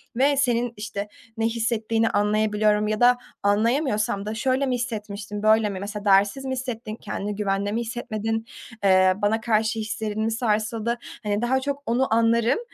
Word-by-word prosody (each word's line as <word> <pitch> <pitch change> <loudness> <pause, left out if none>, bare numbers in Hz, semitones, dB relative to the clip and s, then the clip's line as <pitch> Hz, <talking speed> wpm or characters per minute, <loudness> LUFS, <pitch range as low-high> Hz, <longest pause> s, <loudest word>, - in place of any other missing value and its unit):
ve 275 +3 +3
senin, 240 -3 +1
işte, 205 -1 -5 0.3
ne 225 - 0
hissettiğini 225 -1 0
anlayabiliyorum 210 0 +2
ya 215 0 -1
da 245 0 +5 0.3
anlayamıyorsam 210 -1 +1
da 215 - -3
şöyle 260 +3 +1
mi 255 -1 0
hissetmiştin, 210 -3 -5
böyle 215 -1 +4
mi, 190 -2 -5
mesela, 205 +1 -6
değersiz 200 +7 +3
mi 260 - -3
hissettin, 240 -4 -5
kendini 205 -2 -5
güvende 200 0 -1
mi 230 +2 -1
hissetmedin, 225 -1 -3 0.4
ııı, 185 +1 +4
bana 220 +2 +1
karşı 220 0 +1
hislerin 215 0 -3
mi 225 - 0
sarsıldı, 225 +1 -1 0.3
hani, 205 +1 -1
daha 260 +2 +2
çok 280 +1 -4
onu 240 0 +1
anlarım 230 - +3
220 Hz, 160 wpm, -24 LUFS, 210-235 Hz, 0.4 s, da